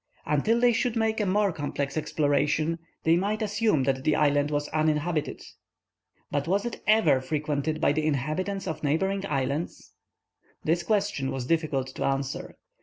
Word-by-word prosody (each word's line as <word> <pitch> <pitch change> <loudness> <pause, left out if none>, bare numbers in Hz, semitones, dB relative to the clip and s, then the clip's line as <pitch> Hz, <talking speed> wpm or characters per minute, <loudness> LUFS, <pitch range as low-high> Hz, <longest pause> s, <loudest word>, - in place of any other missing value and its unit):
Until 150 +11 +2
they 245 0 +4
should 240 0 0
make 225 -1 +1
a 210 - 0
more 200 +1 +2
complete 145 -3 -3
exploration, 155 +1 +1 0.2
they 165 +1 +4
might 205 +5 0
assume 210 - +1
that 130 0 0
the 155 0 +2
island 145 0 +2
was 145 0 -1
uninhabited. 155 0 0 0.9
But 145 +1 -1
was 200 +4 +1
it 240 - -5
ever 170 -12 +4
frequented 150 +2 -2
by 155 - +3
the 155 +1 0
inhabitants 155 +8 -1
of 160 - -4
neighboring 190 +7 0
islands? 140 +2 -3 0.7
This 165 +3 +1
question 205 -11 0
was 130 -2 -3
difficult 155 -3 0
to - - -5
answer. 135 +4 -2
155 Hz, 155 wpm, -27 LUFS, 145-195 Hz, 0.9 s, they